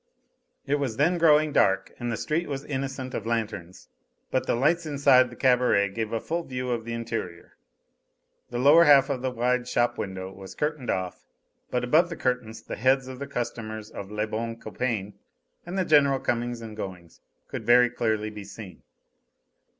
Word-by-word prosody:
It 145 +1 0
was 130 -6 -2
then 170 +5 +2
growing 155 -2 +5
dark 95 0 +2
and 120 0 -2
the 115 - -2
street 165 +3 -1
was 140 0 -4
innocent 135 -2 -4
of 110 - -4
lanterns, 110 -6 -3 0.4
but - - 0
the - - +2
lights 160 +7 +1
inside 135 -3 +4
the 120 - -11
cabaret 125 -6 +3
gave 110 +2 -4
a 115 - -1
full 170 +7 -2
view 125 -3 -4
of 115 -2 -2
the 115 - -4
interior. 115 -7 -5 0.9
The 120 - -4
lower 145 +7 +7
half 140 -2 +6
of 130 -3 -2
the 130 - 0
wide 125 0 0
shop 120 -1 +1
window 95 -1 -5
was 95 0 -11
curtained 150 -4 -2
off, 95 -1 -3 0.4
but 125 - -1
above 155 +8 +4
the 170 - -5
curtain 125 -5 -1 0.2
the - - -5
heads 130 +3 +2
of 130 -1 -8
the 140 - -5
customers 110 -4 -5
of 100 - -7
"Le 105 0 -2
Bon 115 +2 -4
Copain," 110 -5 -3 0.5
and 180 +2 -4
the 185 - +1
general 140 -3 +4
comings 120 -1 -2
and 110 -2 -8
goings, 90 -5 -8 0.3
could - - -6
very 120 0 +5
clearly 110 -3 -1
be 105 -1 -8
seen. 100 -1 -11
120 Hz, 180 wpm, -26 LUFS, 110-135 Hz, 0.9 s, lower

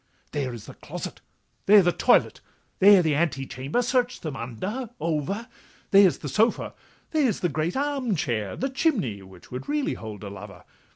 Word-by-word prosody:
'There 140 -4 -2
is 120 -3 -9
the - - -10
closet, - - -8 0.5
there 205 -1 +8
the 175 - +3
toilet, - - +3 0.4
there 195 -1 +7
The 160 -2 +2
antechamber—search 170 - -1
them 155 -4 -5
under, 185 - -5
over; 170 - -2 0.4
There 195 0 +8
is 175 - -1
the 150 - -7
sofa, 215 - +1 0.4
there 295 -7 +3
the 180 -3 -1
great 160 - -2
arm 275 -6 0
chair, 115 - -2
The 270 +1 -2
chimney—which 110 - -2
would 125 - -6
really 295 -1 0
hold 105 -3 -8
a 100 - -6
lover. 100 -3 -10
170 Hz, 160 wpm, -25 LUFS, -, 0.5 s, there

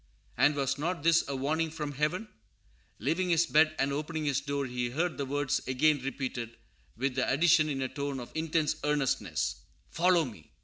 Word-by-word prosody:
And 145 0 +4
was 135 0 -1
not 170 0 -2
this 165 0 +5
a 140 - -3
warning 155 +5 0
from 150 -2 -4
Heaven? 155 +9 -1 0.7
Leaving 180 +2 0
his 170 0 +4
bed 155 0 +4
and 140 +1 0
opening 155 +2 -3
his 140 -1 +1
door, 140 -1 -2
he 125 -1 -2
heard 160 +6 -1
the 140 - -2
words 145 +1 0
again 140 +3 +3
repeated, 130 -4 -4 0.4
with 135 +2 0
the 130 0 0
addition, 155 +2 +4
in 135 -2 -1
a - - 0
tone 140 0 -4
of 120 - -8
intense 160 -1 0
earnestness, 135 - 0 0.3
"Follow 175 -1 +3
me!" 105 - -11
145 Hz, 180 wpm, -30 LUFS, 135-160 Hz, 0.7 s, this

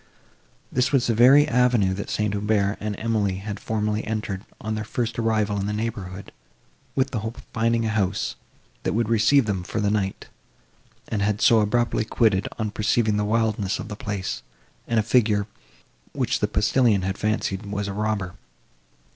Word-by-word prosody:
This 130 +2 +1
was 135 -4 +3
the 115 - +2
very 130 +6 +6
avenue 120 -6 +3
that 100 +2 -5
St. 105 -1 0
Aubert 105 0 +1
and 105 -1 -3
Emily 110 -4 0
had 100 +2 -6
formerly 105 0 -1
entered, 105 -3 -3 0.2
on 110 0 -3
their 110 0 -2
first 115 +1 -3
arrival 110 -3 +1
in 100 - -2
the 105 - -2
neighbourhood, 100 -3 -5 0.6
with 135 0 +1
the 115 - -1
hope 110 +2 -5
of - - -11
finding 115 0 +1
a - - 0
house, 100 - -1 0.5
that - - -1
would 115 0 0
receive 115 +4 +4
them, 100 -4 -1
for 100 +5 -4
the 100 -1 +1
night, 100 -2 -2 0.8
and 105 - -2
had 105 +1 +1
so 115 -1 +5
abruptly 120 +2 +1
quitted, 110 -3 +2
on 110 -2 -2
perceiving 105 0 +1
the 105 - +1
wildness 110 -3 0
of 110 - -7
the 105 - -5
place, 100 -2 -4 0.5
and 115 -1 +2
a - - +2
figure, 105 -2 +2 0.7
which - - 0
the - - +1
postillion 105 -1 +2
had 95 0 -1
fancied 105 -1 -2
was 100 0 -3
a 100 - -3
robber. 105 -3 -2
105 Hz, 180 wpm, -24 LUFS, 100-115 Hz, 0.8 s, very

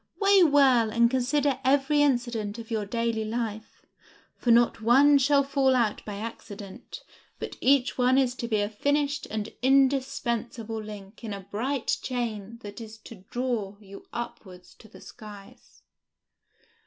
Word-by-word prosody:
Weigh 395 -1 +5
well 275 -8 +5
and 235 +2 +3
consider 265 +1 +1
every 280 +2 +3
incident 240 -6 0
of 230 0 -10
your 215 -2 -2
daily 230 0 -1
life, 220 -1 -5 0.5
for 245 - -3
not 235 -1 +4
one 275 +5 +5
shall 280 +1 +3
fall 270 -1 +2
out 230 -4 0
by 210 - -6
accident, 205 -2 -9 0.3
but - - -6
each 265 -1 +2
one 250 +1 +4
is 260 -2 +2
to 235 - -4
be 215 -3 +1
a 205 - 0
finished 285 +6 -1
and 215 0 -4
indispensable 250 -4 0
link 210 0 -11
in 215 -3 -5
a 200 - -8
bright 235 +7 -2
chain 230 -4 -4
that 205 +2 -8
is 220 -1 -10
to 215 -3 -13
draw 235 -6 -3
you 200 -1 -12
upward 190 -6 -7
to 185 +4 -18
the 220 - -16
skies!" 210 -3 -14
235 Hz, 150 wpm, -26 LUFS, 215-265 Hz, 0.5 s, Weigh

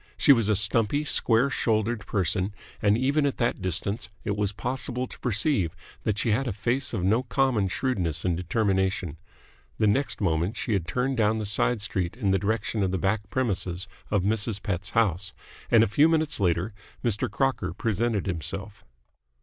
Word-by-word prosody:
She 140 - +7
was 115 -5 +1
a 105 - +4
stumpy, 110 +7 +1
square 130 -2 +3
shouldered 110 -3 0
person, 95 +1 0 0.3
and 105 +1 +4
even 140 +4 +2
at 140 - -2
that 120 -4 0
distance 100 +4 -2
it 100 - -1
was 105 -1 0
possible 125 +3 -2
to - - -13
perceive 105 - 0 0.3
that 110 -2 0
she 115 - +1
had 130 +6 +1
a - - 0
face 125 +7 0
of 90 - -2
no 110 +6 +3
common 125 -5 +1
shrewdness 90 - -1
and 90 -2 +2
determination. 95 -2 0 0.6
The - - +2
next 130 +7 +1
moment 85 +2 0
she 115 - -1
had 90 -4 -1
turned 125 +8 -1
down 110 0 +2
the 110 - -3
side 105 +2 +1
street 95 -1 -2
in 100 -6 +1
the 95 - +3
direction 110 +2 -1
of 95 - +2
the 95 - -1
back 100 +2 -1
premises 95 -7 -1 0.2
of 100 -3 +1
Mrs. 105 0 0
Pett's 95 -1 -2
house: 100 -4 +1 0.4
and 115 -1 +6
a - - +2
few 145 +10 +4
minutes 160 -4 +1
later 90 +2 +1 0.3
Mr. 120 +2 +1
Crocker 130 -6 0
presented 110 +2 -1
himself. 95 +3 -5
105 Hz, 180 wpm, -26 LUFS, 95-120 Hz, 0.6 s, She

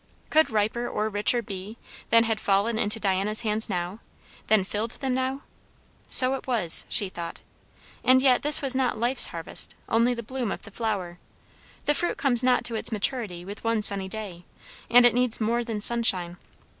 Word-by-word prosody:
Could 315 +1 +3
riper 220 +3 -2
or 215 +1 -3
richer 210 +3 -1
be, 200 +2 -9 0.3
than 230 0 +4
had 225 -1 -2
fallen 205 +3 -1
into 210 +1 -1
Diana's 200 +1 -1
hands 220 -1 0
now? 180 +4 -5 0.5
than 215 -3 +2
filled 210 +4 -5
them 265 -2 -3
now? 260 +2 -4 0.7
So 255 0 +8
it 270 - -7
was, 215 -10 +2
she 200 - +1
thought. 170 -2 -8 0.6
And 260 0 +4
yet 260 -2 +2
this 295 0 +5
was 270 -2 +3
not 260 -4 -1
life's 245 +3 +2
harvest, 165 -1 +2
only 235 +2 +1
the 235 - -7
bloom 245 -2 -5
of - - -7
the 220 - -13
flower; 195 -6 -5 0.7
the 295 - +1
fruit 345 +4 -2
comes 255 -4 +2
not 250 0 +1
to 235 - -3
its 220 - -1
maturity 210 -5 -2
with 200 +2 -10
one 225 -2 -1
sunny 195 -2 +3
day, 190 -4 -9 0.5
and 245 +1 +5
it 245 - +4
needs 245 -1 0
more 235 +2 -1
than 225 -3 -6
sunshine. 200 -6 +3
225 Hz, 180 wpm, -24 LUFS, 200-245 Hz, 0.7 s, So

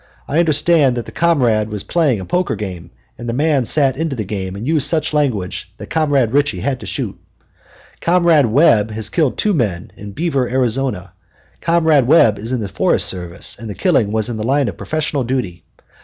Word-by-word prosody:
I 150 - 0
understand 155 -4 +3
that 120 - -3
the - - -10
comrade 120 -11 +1
was 105 -2 -5
playing 150 - +1
a 95 - -6
poker 180 - 0
game, 95 -4 -7 0.3
and 120 0 -5
the - - -1
man 145 -1 +1
sat 135 0 +2
into 160 -3 -2
the 110 - -3
game 95 -2 -5
and 105 +4 -6
used 150 -1 +1
such 155 0 -1
language 125 -12 -1
that - - -10
Comrade 145 -7 +1
Ritchie 145 +1 +1
had 135 -2 -1
to - - -9
shoot. - - -4 0.8
Comrade 170 -5 +3
Webb 110 -4 +4
has 110 0 -4
killed 155 -7 +1
two 210 - +1
men 100 - -2
in 100 0 -9
Beaver, 140 - -1
Arizona. 125 -7 -1 0.5
Comrade 160 -6 +3
Webb 115 -8 +5
is 110 +4 -5
in 125 -3 -1
the 105 - -3
Forest - - 0
Service, 90 -1 -6
and 115 -1 -7
the 100 - -6
killing 135 - +1
was 110 -1 0
in 120 -2 -4
the 110 - -3
line 135 +3 +1
of - - -7
professional 155 -3 -2
duty. 115 -9 -3
130 Hz, 200 wpm, -18 LUFS, 105-155 Hz, 0.8 s, Webb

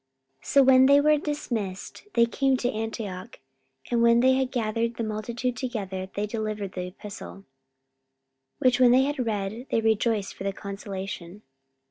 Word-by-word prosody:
44:015:030 - - -24
So 275 - +5
when 260 0 +6
they 280 +1 +6
were 300 +1 +4
dismissed, 230 -11 -4
they 235 - +6
came 265 +2 +1
to 245 0 -1
Antioch: 220 -1 -5 0.5
and 235 -1 +2
when 235 0 +5
they 260 +1 +5
had 260 -1 0
gathered 230 0 -1
the 230 - -3
multitude 230 +3 -3
together, 195 -8 -4
they 205 - -1
delivered 215 -2 -4
the 180 -1 -5
epistle: 200 +2 -9
44:015:031 195 - -15 1.1
Which 255 -1 +3
when 250 -1 +6
they 260 +1 +5
had 280 -2 -1
read, 215 +4 -3
they 225 - +1
rejoiced 220 -2 +1
for - - -9
the 195 0 -1
consolation. 195 -1 -7
225 Hz, 165 wpm, -26 LUFS, 200-250 Hz, 1.1 s, when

